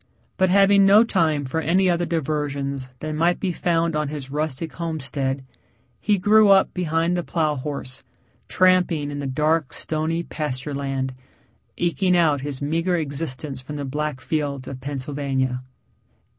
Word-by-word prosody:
But 185 -1 +2
having 200 +1 +5
no 205 +3 +7
time 160 -10 +1
for 150 +5 -2
any 185 +4 +2
other 175 -1 +1
diversions 140 -4 -2
than 155 0 -3
might 170 +3 +2
be 190 - -1
found 170 -1 0
on 150 -1 0
his 140 -2 -6
rustic 155 +1 -3
homestead, 140 -5 -3 0.5
he 210 -1 +2
grew 210 +3 +5
up 195 -1 +5
behind 165 -1 0
the 175 - 0
plow 155 -3 0
horse, 135 -1 -5 0.5
tramping 180 -5 +2
in 145 - -5
the 140 - -3
dark, 150 +2 +1
stony 160 +2 -2
pasture 145 -3 -4
land, 135 -2 -2 0.6
eking 180 +1 +2
out 155 -5 +3
his 140 -1 -5
meager 165 +5 0
existence 140 -3 -3
from 145 +3 -8
the 145 -1 -4
black 150 0 -3
fields 145 -4 -2
of 130 -1 -7
Pennsylvania. 135 -2 -2
150 Hz, 150 wpm, -23 LUFS, 140-170 Hz, 0.6 s, no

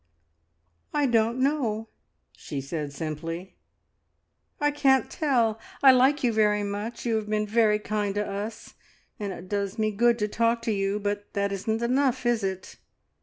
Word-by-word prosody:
"I 295 -1 +3
don't 230 -1 +2
know," 250 -6 0 0.5
she 145 - -6
said 145 +1 -4
simply. 165 +5 -6 1.0
"I 295 0 +2
can't 270 -2 +3
tell. 240 -8 +1 0.2
I 270 - +10
like 265 +3 +4
you 240 -2 +2
very 210 -1 +2
much; 205 +4 -4
you 230 -2 +1
have 215 -1 -4
been 215 0 +1
very 215 0 +3
kind 210 -1 -2
to 210 0 0
us, 205 +3 -6 0.5
and 205 -2 -3
it 185 0 -8
does 200 +1 -2
me 215 -1 +1
good 235 +3 +3
to 210 -2 0
talk 230 +2 +1
to 230 - 0
you, 200 0 0
but 205 0 -3
that 200 0 0
isn't 220 +4 -2
enough, 255 +1 +1
is 240 -3 +2
it? 190 -1 -4
215 Hz, 165 wpm, -26 LUFS, 200-240 Hz, 1.0 s, I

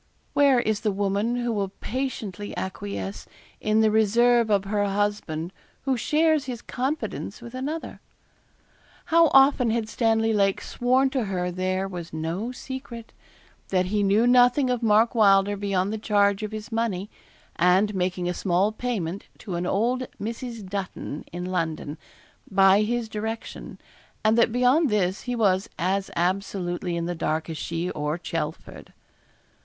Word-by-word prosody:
Where 280 -3 +5
is 215 -3 0
the 210 - 0
woman 200 +4 0
who 240 -1 -1
will 200 -2 -1
patiently 225 -6 -4
acquiesce 100 - -5 0.3
in 215 +1 +2
the 220 -1 +4
reserve 230 +2 +4
of 200 -2 +3
her 205 +1 0
husband 195 -4 -2 0.3
who 270 -1 +1
shares 305 +4 +2
his 250 -3 -5
confidence 255 -6 -3
with 235 0 -10
another? 290 +6 -5 1.1
How 335 0 +7
often 270 -3 +5
had 225 -1 0
Stanley 225 -1 +1
Lake 195 -2 +2
sworn 260 +2 +1
to 260 -5 0
her 180 -2 -2
there 185 +1 -1
was 175 -3 -7
no 165 +9 -3
secret; 255 -3 -8 0.5
that 185 -1 +1
he 210 - +2
knew 205 +3 +3
nothing 250 +2 +5
of 245 -1 -1
Mark 225 +1 +4
Wylder 200 -2 +4
beyond 200 0 -1
the 220 - -3
charge 200 -2 +2
of 215 0 -4
his 215 +1 -7
money, 220 -4 -1 0.5
and 185 +4 +3
making 180 -1 -1
a 180 - 0
small 185 +3 +1
payment 205 -6 -3
to 195 - -7
an 175 +1 -2
old 245 +7 0
Mrs. 230 -1 -5
Dutton, 185 -6 -5
in 180 +1 -5
London, 160 -4 -3 0.5
by 195 +1 +5
his 235 +1 -1
direction, 220 +1 -6 0.5
and 215 +1 +5
that 235 0 +4
beyond 250 +6 +3
this, 195 -3 0
he 245 - 0
was 200 -2 +2
as 190 +3 0
absolutely 180 -1 -1
in 170 - -2
the 175 - -2
dark 160 0 -2
as 160 - -5
she 170 +2 -3
or 150 +1 -2
Chelford. 170 - -5
205 Hz, 150 wpm, -25 LUFS, 185-235 Hz, 1.1 s, How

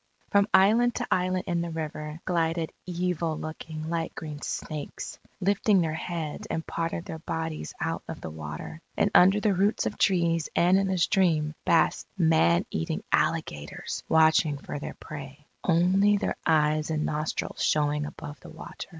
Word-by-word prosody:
From 200 0 +4
island 230 +5 +5
to - - -1
island 185 0 +1
in 170 -1 0
the 170 - -3
river, 155 0 -5
glided 165 -2 0 0.2
evil 175 -3 -1
looking, 155 0 -6
light 165 -1 -2
green 150 -2 -7
snakes, 155 -2 -5 0.2
lifting 200 +1 +3
their 160 -3 0
heads 160 -2 -4
and 160 - -3
part 165 0 -2
of 170 - -4
their 160 - -6
bodies 160 - -4
out - - -2
of - - -6
the - - -6
water. 75 - -7 0.2
And 205 - +2
under 190 +3 +6
the 205 -1 +2
roots 200 +4 +1
of - - -3
trees 170 -4 +2
and 180 +3 +5
in 195 - +1
the 190 -1 0
stream, 165 -5 +2
basked - - +3
man 80 +1 +4
eating 80 - -2
alligators 75 0 -1
watching 160 -2 +4
for 145 - -6
their - - -6
prey, 145 -1 -9 0.2
only 190 +4 +4
their - - -1
eyes 155 -1 +3
and 155 -1 0
nostrils 155 +1 -2
showing 150 0 +1
above 145 0 -9
the - - -12
water. 160 - -9
160 Hz, 165 wpm, -27 LUFS, 150-180 Hz, 0.2 s, under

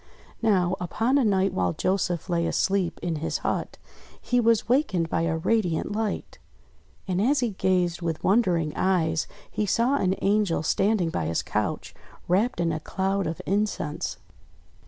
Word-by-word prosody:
Now, 190 -5 +2
upon 225 - +1
a - - +3
night 195 -3 +2
while 90 -2 0
Joseph 185 -3 -1
lay 170 -2 0
asleep 190 -3 0
in 170 -3 -1
his 160 - -2
hut, - - -2 0.4
he 245 - +1
was 230 -2 +3
wakened 220 - +1
by 165 - 0
a 160 -1 0
radiant 180 -2 0
light. 215 0 -3 0.7
And 185 0 0
as 270 +5 +2
he 240 -3 0
gazed 180 -3 0
with 165 -2 -3
wondering 180 -7 +2
eyes 160 -4 +1 0.2
he 210 - -1
saw 240 +8 +2
an 190 -6 +1
Angel 200 -5 +2
standing 195 0 +1
by 80 - -2
his 80 - -1
couch, - - -2 0.3
wrapped 210 +8 +1
in 170 -1 +1
a 155 - -2
cloud 195 +2 -1
of 160 - -5
incense. 200 -6 -1
190 Hz, 155 wpm, -26 LUFS, 165-215 Hz, 0.7 s, a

